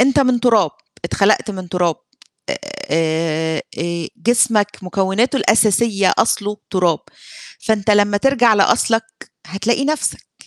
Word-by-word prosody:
أنت 270 +2 +4
من 255 -3 +2
تراب، 220 -9 +3 0.3
اتخلقت 200 +5 +1
من 185 -3 -7
تراب 175 -2 0 0.9
آآ 160 -1 -1 0.2
آآ 170 -1 -3
جسمك 230 -3 +1
مكوناته 195 +7 0
الأساسية 215 -4 +2
أصله 210 -2 0
تراب، 180 -4 +1 0.6
فأنت 215 -1 0
لمّا 205 0 +3
ترجع 240 -1 +3
لأصلك 225 +2 +2 0.4
هتلاقي 215 - -1
نفْسك. 305 +2 -3
205 Hz, 110 wpm, -18 LUFS, 180-235 Hz, 0.9 s, أنت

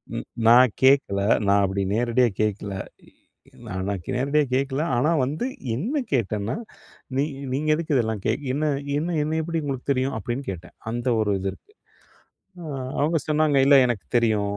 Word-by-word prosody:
ம் - - -4 0.2
நான் 120 -1 +7
கேக்கல. 130 -7 +4 0.3
நான் 100 0 +4
அப்படி 95 +1 -2
நேரடியா 120 +2 +2
கேக்கல. 105 -1 -1 0.9
நான் 95 0 -4
நான் 100 -4 -3
நேரடியா 140 +4 +2
கேக்கல. 135 +2 0
ஆனா 145 +7 +2
வந்து 150 - -3 0.3
என்ன 245 - -1
கேட்டேன்னா, 105 -3 -1 0.6
"நீ 140 - +3 0.3
நீங்க 150 +3 -1
எதுக்கு 155 -2 -1
இதெல்லாம் 110 -4 0
கே - - +2 0.2
என்ன 150 +3 -1 0.3
என்ன 165 +3 -1
என்ன 155 +2 -1
எப்படி 165 0 -2
உங்களுக்கு 140 -1 -2
தெரியும்?" 130 -1 0
அப்படின்னு 120 +6 -4
கேட்டேன். 90 -1 -10 0.2
அந்த 120 +2 -3
ஒரு 105 -1 +1
இது 95 +1 -2
இருக்கு. 420 - -21 0.9
ஆ - - -8 0.3
அவங்க 155 +4 +2
சொன்னாங்க 155 -1 +2
"இல்ல 140 0 +7
எனக்கு 120 -5 -2
தெரியும்". 105 -3 +1
130 Hz, 155 wpm, -24 LUFS, 105-145 Hz, 0.9 s, நான்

